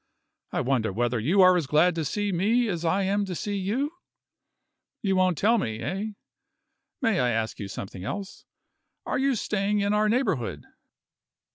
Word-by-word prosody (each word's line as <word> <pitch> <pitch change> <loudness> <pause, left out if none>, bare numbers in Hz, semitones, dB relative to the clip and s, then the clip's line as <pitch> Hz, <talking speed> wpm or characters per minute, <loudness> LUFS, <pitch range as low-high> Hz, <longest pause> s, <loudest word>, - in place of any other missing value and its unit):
I - - 0
wonder 125 -5 0
whether 120 +3 0
you 170 - +3
are 185 0 +7
as 165 -6 0
glad 155 +5 +4
to 165 -1 -2
see 205 +6 -1
me 220 +7 +2
as 175 -3 -3
I 185 +4 +1
am 200 +2 +1
to 185 -2 -5
see 205 +4 -3
you? 220 +10 -1 1.1
You 195 -2 +1
won't 185 -3 +2
tell 230 +3 +3
me 110 - -2
eh? 195 - -3 1.0
May 225 -6 +2
I 125 - +2
ask 110 -1 -2
you 100 - -4
something 95 -2 -7
else? 200 - -6 0.6
Are - - -1
you 270 -1 +2
staying 205 -1 0
in 200 +1 +1
our 210 0 +2
neighborhood?" 140 - -1
185 Hz, 170 wpm, -26 LUFS, 135-205 Hz, 1.1 s, are